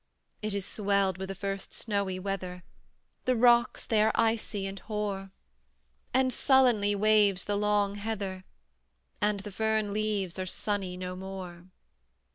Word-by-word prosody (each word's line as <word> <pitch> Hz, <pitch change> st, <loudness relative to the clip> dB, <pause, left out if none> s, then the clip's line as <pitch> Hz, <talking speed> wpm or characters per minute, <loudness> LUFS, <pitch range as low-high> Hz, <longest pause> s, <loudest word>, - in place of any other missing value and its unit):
It 210 Hz, -1 st, -2 dB
is 200 Hz, -2 st, -2 dB
swelled 200 Hz, -3 st, +1 dB
with 190 Hz, 0 st, -4 dB
the 195 Hz, -, -4 dB
first 195 Hz, 0 st, -4 dB
snowy 200 Hz, -4 st, -1 dB
weather; 185 Hz, -2 st, -4 dB, 0.6 s
The 255 Hz, -, +3 dB
rocks 240 Hz, 0 st, +4 dB
they 220 Hz, -2 st, +2 dB
are 220 Hz, +1 st, +4 dB
icy 220 Hz, -3 st, 0 dB
and 195 Hz, 0 st, -5 dB
hoar, 205 Hz, -2 st, -3 dB, 0.8 s
And 260 Hz, 0 st, +2 dB
sullenly 245 Hz, -7 st, +4 dB
waves 205 Hz, -2 st, +4 dB
the 205 Hz, -, -1 dB
long 205 Hz, -1 st, +2 dB
heather, 200 Hz, -3 st, -4 dB, 0.8 s
And 210 Hz, -1 st, +1 dB
the 205 Hz, +1 st, -8 dB
fern 220 Hz, 0 st, 0 dB
leaves 205 Hz, -4 st, -1 dB
are 185 Hz, -, -2 dB
sunny 190 Hz, -2 st, -2 dB
no 180 Hz, 0 st, -5 dB
more. 185 Hz, -2 st, -7 dB
200 Hz, 140 wpm, -29 LUFS, 190-215 Hz, 0.8 s, rocks